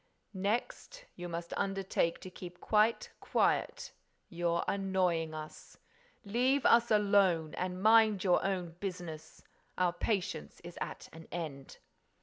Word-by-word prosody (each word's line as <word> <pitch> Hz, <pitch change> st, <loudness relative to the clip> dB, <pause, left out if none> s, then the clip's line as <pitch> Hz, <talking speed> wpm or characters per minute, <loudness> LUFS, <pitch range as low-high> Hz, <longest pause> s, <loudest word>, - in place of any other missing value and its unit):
"Next, 235 Hz, -, -3 dB
you 175 Hz, 0 st, -6 dB
must 170 Hz, 0 st, -5 dB
undertake 195 Hz, -4 st, -1 dB
to 185 Hz, -, -9 dB
keep 180 Hz, -1 st, -10 dB
quite 215 Hz, +1 st, +2 dB
quiet. -, -, 0 dB, 0.4 s
You're 170 Hz, -1 st, 0 dB
annoying 180 Hz, -5 st, 0 dB
us. 155 Hz, 0 st, -9 dB, 0.5 s
Leave 255 Hz, +6 st, +1 dB
us 235 Hz, 0 st, +5 dB
alone 200 Hz, -7 st, +3 dB
and 185 Hz, +1 st, -4 dB
mind 220 Hz, -3 st, +5 dB
your 180 Hz, -3 st, +3 dB
own 185 Hz, -3 st, -2 dB
business. 180 Hz, -5 st, -7 dB, 0.3 s
Our 180 Hz, -1 st, +2 dB
patience 180 Hz, -4 st, -2 dB
is 175 Hz, 0 st, -9 dB
at -, -, -5 dB
an 160 Hz, 0 st, -12 dB
end." 150 Hz, -6 st, -6 dB
185 Hz, 125 wpm, -32 LUFS, 170-205 Hz, 0.5 s, us